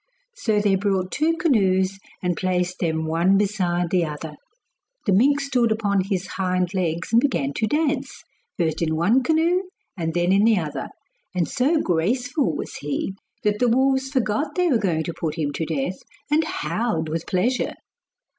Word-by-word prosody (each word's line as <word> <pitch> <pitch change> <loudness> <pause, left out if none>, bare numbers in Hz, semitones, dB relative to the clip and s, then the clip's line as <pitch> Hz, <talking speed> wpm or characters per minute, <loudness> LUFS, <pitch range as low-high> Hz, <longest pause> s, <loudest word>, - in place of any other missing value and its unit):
So 220 - 0
they 205 -1 +2
brought 190 -1 0
two 325 +2 +1
canoes 195 - +2 0.2
and 180 -1 +1
placed 180 -1 -1
them 160 -2 0
one 170 +5 +3
beside 180 -4 0
the 180 -2 +3
other. 150 0 -5 0.7
The 200 - +3
mink 275 +9 +4
stood 255 -5 +1
up 220 0 -1
on 200 -1 +3
his 195 -2 -2
hind 185 -1 -1
legs 170 -3 -1
and 230 +1 +5
began 145 - 0
to 220 - +1
dance, 300 +4 -1 0.3
first 165 -4 0
in 160 -1 +1
one 210 +11 +3
canoe 325 +5 +2 0.3
and 165 -3 -3
then 175 +1 +2
in 200 +2 +4
the 225 -1 +4
other; 155 -4 -3 0.5
and 175 -3 +1
so 285 +5 +2
graceful 245 - 0
was - - -5
he, 145 +6 -3 0.3
that 210 0 +1
the 245 - +3
wolves 265 +2 +2
forgot 265 +3 -1
they 360 -1 +2
were 245 -6 +3
going 170 -6 0
to 170 - -4
put 160 -3 -3
him 145 -3 -1
to 160 - -2
death, 160 +3 -2 0.3
and 315 +2 +3
howled 165 +1 -2
with 160 +1 -3
pleasure. 235 +8 0
195 Hz, 175 wpm, -23 LUFS, 170-250 Hz, 0.7 s, and